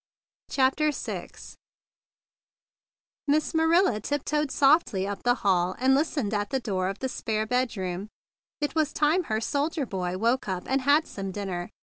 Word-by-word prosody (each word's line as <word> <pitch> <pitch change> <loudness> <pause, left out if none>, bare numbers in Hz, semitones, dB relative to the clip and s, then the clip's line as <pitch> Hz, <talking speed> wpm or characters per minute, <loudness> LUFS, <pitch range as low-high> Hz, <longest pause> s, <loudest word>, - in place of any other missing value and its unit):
CHAPTER 275 +3 +2
VI - - -5 2.0
Miss 300 +2 +2
Marilla 320 - +3
tiptoed 290 +4 -1
softly 270 - +3
up 200 -1 -4
the 245 0 +3
hall, 185 -1 +2
and 260 +1 +3
listened 280 -6 0
at 205 -1 -1
the 265 - 0
door 190 -6 -1
of 195 - -5
the 265 - -2
spare 220 -4 -2
bedroom. 210 -6 -2 0.5
It 295 - -1
was 310 -2 +1
time 315 +4 +2
her 215 -4 -1
soldier 285 +5 -1
boy 185 -4 -3
woke 235 +5 +1
up 185 -2 -2
and 265 +1 0
had 285 +4 +4
some 195 -1 -6
dinner. 185 -3 -4
250 Hz, 150 wpm, -27 LUFS, 200-295 Hz, 2.0 s, had